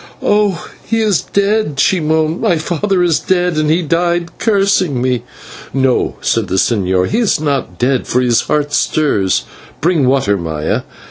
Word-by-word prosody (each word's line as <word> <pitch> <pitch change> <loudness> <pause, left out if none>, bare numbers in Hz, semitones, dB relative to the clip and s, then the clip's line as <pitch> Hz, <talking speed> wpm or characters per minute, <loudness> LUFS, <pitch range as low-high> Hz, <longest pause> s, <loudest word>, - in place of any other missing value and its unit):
"Oh, 205 -4 +1 0.2
he 225 - -1
is 210 -6 +2
dead," 200 -7 0
she 185 +5 +3
moaned; 160 +1 0
"my 175 - +2
father 180 +4 0
is 170 -3 +2
dead, 180 -2 0
and 155 0 +1
he 170 +3 +2
died 170 +2 -1
cursing 195 - +1
me." 125 -2 0 0.5
"No," 130 -2 +1
said - - 0
the 95 - -2
señor, 95 -3 +1
"he 230 - 0
is 225 -10 +1
not 140 - -2
dead, 130 +1 0
for 125 - +1
his 120 -2 +2
heart 145 -1 -1
stirs. 120 -15 +1 0.4
Bring 160 -5 +1
water, 125 -7 +2
Maya." 80 -2 -2
155 Hz, 160 wpm, -15 LUFS, 125-180 Hz, 0.5 s, she